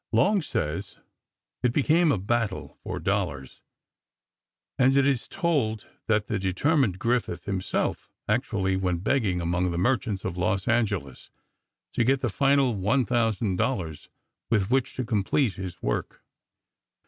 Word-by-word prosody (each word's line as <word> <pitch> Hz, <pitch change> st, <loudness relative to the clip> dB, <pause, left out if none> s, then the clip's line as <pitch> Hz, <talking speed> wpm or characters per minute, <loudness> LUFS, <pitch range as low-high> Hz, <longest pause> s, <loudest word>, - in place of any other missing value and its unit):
Long 190 Hz, -, +3 dB
says: 75 Hz, -, -3 dB, 0.6 s
It 125 Hz, -2 st, +1 dB
became 160 Hz, +4 st, +3 dB
a -, -, +2 dB
battle 105 Hz, +1 st, -2 dB
for -, -, -4 dB
dollars, 90 Hz, -10 st, -2 dB, 1.2 s
and 135 Hz, +1 st, +4 dB
it 140 Hz, -, +4 dB
is 135 Hz, -4 st, +1 dB
told 145 Hz, -, 0 dB, 0.2 s
that 105 Hz, -2 st, +2 dB
the -, -, -2 dB
determined 100 Hz, -, +1 dB
Griffith 120 Hz, +3 st, -1 dB
himself 95 Hz, -2 st, -2 dB, 0.2 s
actually 105 Hz, -4 st, 0 dB
went 90 Hz, -2 st, -1 dB
begging 105 Hz, -8 st, +1 dB
among 90 Hz, +2 st, 0 dB
the 85 Hz, -, -3 dB
merchants 105 Hz, 0 st, 0 dB
of 85 Hz, -, -3 dB
Los 95 Hz, +3 st, 0 dB
Angeles 105 Hz, -, -1 dB, 0.6 s
to 120 Hz, -, +2 dB
get 135 Hz, +3 st, +2 dB
the 120 Hz, -, 0 dB
final 135 Hz, +2 st, +3 dB
one 110 Hz, +6 st, +1 dB
thousand 110 Hz, -4 st, 0 dB
dollars 95 Hz, -, -2 dB, 0.4 s
with 105 Hz, -1 st, +1 dB
which 135 Hz, 0 st, +1 dB
to 130 Hz, -, -2 dB
complete 110 Hz, +2 st, +1 dB
his 90 Hz, -2 st, -7 dB
work. -, -, -3 dB
110 Hz, 135 wpm, -26 LUFS, 95-130 Hz, 1.2 s, and